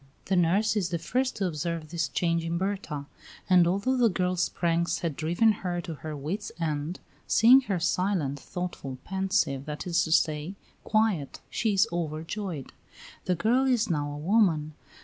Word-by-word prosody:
The 190 - +1
nurse 195 +6 +3
is 190 -5 0
the 170 - -1
first 255 +10 -1
to 200 - -1
observe 165 -1 -3
this 170 -3 -1
change 170 +4 0
in 165 +1 -2
Berta, 190 -7 -3 0.4
and 180 -2 +5
although 200 +9 +1
the 240 -2 +4
girl's 180 -2 0
pranks 170 0 0
had 165 -4 -2
driven 175 +9 +3
her 175 -2 -2
to 165 - -6
her 155 0 -6
wits' 175 +9 -4
end, 155 +1 -2 0.3
seeing 250 +5 +7
her 190 -3 +1
silent, 175 -5 0
thoughtful, 175 -6 -5
pensive, 190 -8 0
that 150 0 -5
is 175 -2 +2
to 160 - -5
say, 155 +3 +1 0.3
quiet, 215 -10 0
she 220 -3 0
is 195 - +4
overjoyed. 165 0 -4 0.5
The 180 - +1
girl 245 +9 +2
is 235 -6 +2
now 145 -2 -1
a 145 - -6
woman. 160 -3 +2
175 Hz, 170 wpm, -27 LUFS, 155-200 Hz, 0.5 s, seeing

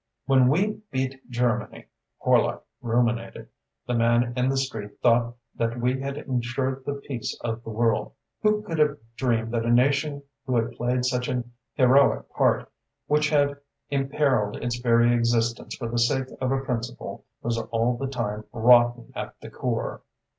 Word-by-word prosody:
"When 130 -1 +5
we 200 +9 +1
beat 130 0 -3
Germany," 120 -1 -1 0.3
Horlock - - +2 0.2
ruminated, 120 0 -1 0.4
"the 125 - -2
man 120 +1 +2
in 125 0 +1
the 135 - 0
street 110 -6 -4
thought 120 0 +3 0.2
that 115 +1 -2
we 125 +2 +1
had 140 +1 -4
ensured 130 -1 -2
the 145 - -1
peace 140 -4 -5
of 115 0 -3
the - - -8
world. 115 0 0 0.3
Who 210 0 +2
could 165 -6 -4
have 150 -1 +3 0.2
dreamed 115 -3 0
that 115 -1 0
a 115 - -1
nation 140 +4 +2 0.2
who 130 - +1
had 115 0 +1
played 125 +1 -1
such 125 0 0
an 120 -1 -3 0.2
heroic 135 +1 +4
part, - - +1 0.3
which 150 +1 +2
had 145 -1 +2 0.3
imperiled 135 -6 +1
its 120 0 -3
very 120 0 +4
existence 115 0 0
for 120 - -5
the 120 +1 -1
sake 130 +2 +1
of 130 0 0
a 135 0 +1
principle, 125 -2 -4 0.2
was 115 0 0
all 115 +1 0
the 135 +3 -3
time 110 -5 -3
rotten 120 0 +4
at - - -6
the - - -10
core!" - - -3
125 Hz, 160 wpm, -25 LUFS, 120-135 Hz, 0.4 s, When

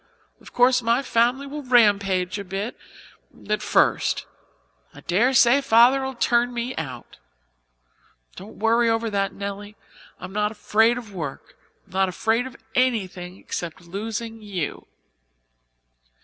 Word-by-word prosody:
Of - - -15
course, 245 +1 +4
my 235 +3 +1
family 245 +3 +1
will 295 +2 -6
rampage 200 -7 +2
a - - -5
bit 195 +4 -4 0.7
at - - 0
first. - - +1 0.7
I - - -12
daresay 245 +6 +4
Father'll 265 +2 +4
turn 240 0 +1
me 240 +2 -3
out. 130 -6 -7 1.2
Don't 205 +3 -11
worry 230 +2 +2
over 225 0 0
that, 195 -1 0
Nelly. 200 +1 -7 0.4
I'm 190 - -9
not 210 0 0
afraid 225 +2 +2
of 225 -5 -9
work. 155 -7 -7 0.3
I'm - - -21
not 190 0 +2
afraid 225 +6 0
of 260 - -12 0.2
anything 190 -8 -1
except 170 -3 -6
losing 220 +5 -6
you." 190 -7 -5
225 Hz, 125 wpm, -23 LUFS, 195-245 Hz, 1.2 s, course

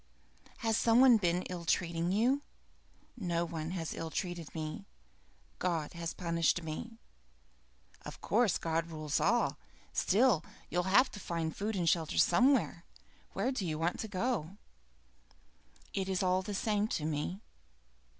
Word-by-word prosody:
"Has 225 -1 +3
some 230 +1 +4
one 255 -3 +8
been 180 -2 +1
ill 180 -2 -6
treating 170 +1 0
you?" 245 +8 +2 0.7
"No 175 -6 -1
one 160 -2 -4
has 170 -3 -3
ill 165 - -4
treated 175 -2 -4
me. 160 +6 -5 0.7
God 165 -4 -1
has 170 -1 -4
punished 170 0 +1
me." 195 +9 -6 1.1
"Of - - -8
course 225 -3 +2
God 165 0 -1
rules 155 -2 -2
all. 205 -10 +2 0.3
Still, 205 -4 +3 0.3
you'll 180 +1 0
have 255 +6 +5
to 205 - -8
find 165 -4 -3
food 210 +2 -2
and 175 -3 0
shelter 165 -2 +1
somewhere. 210 - +3 0.5
Where 215 +7 0
do 255 -7 -2
you 160 -4 -2
want 165 +3 -1
to 220 - -3
go 200 -3 -2 1.4
to?" 195 - 0
"It 190 - -3
is 190 0 0
all 185 0 +2
the 200 +2 -5
same 210 +1 +1
to 150 - -4
me." 155 +5 -2
180 Hz, 150 wpm, -32 LUFS, 165-210 Hz, 1.4 s, one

